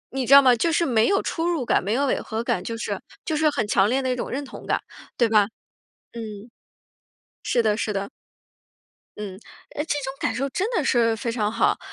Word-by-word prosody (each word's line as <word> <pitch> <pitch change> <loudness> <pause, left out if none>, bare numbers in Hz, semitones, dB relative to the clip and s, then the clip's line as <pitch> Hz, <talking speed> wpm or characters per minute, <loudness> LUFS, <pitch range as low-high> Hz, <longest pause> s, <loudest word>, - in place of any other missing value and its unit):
你 260 -3 -1
知 275 - +5
道 280 - +9
吗？ 255 -2 +6
就 330 +8 +1
是 335 +2 +2
没 230 -5 +3
有 395 - +2
出 330 0 -2
入 330 -7 0
感， - - +2
没 200 +3 -1
有 275 +4 +1
违 270 - 0
和 220 +1 -4
感， 180 -6 -1
就 230 +3 -4
是 - - -4 0.2
就 315 - -1
是 305 0 +3
很 225 -7 -1
强 200 0 +3
烈 260 - +2
的 260 -1 -1
一 - - 0
种 250 - -4
认 280 +2 -3
同 - - -10
感。 - - +1 0.4
对 235 - +4
吧？ 210 -2 +4 0.7
嗯。 220 -2 -8 0.9
是 240 - +1
的 215 -2 +2
是 215 -1 -2
的。 200 0 -3 1.1
嗯， 200 -3 -5 0.4
诶， 295 - -1
这 295 - -1
种 265 - -4
感 - - 0
受 270 +3 -1
真 380 +10 -1
的 360 -10 +1
是 230 -3 +3
非 230 +1 -3
常 215 -3 -1
好。 - - +1
240 Hz, 240 characters per minute, -24 LUFS, 220-275 Hz, 1.1 s, 道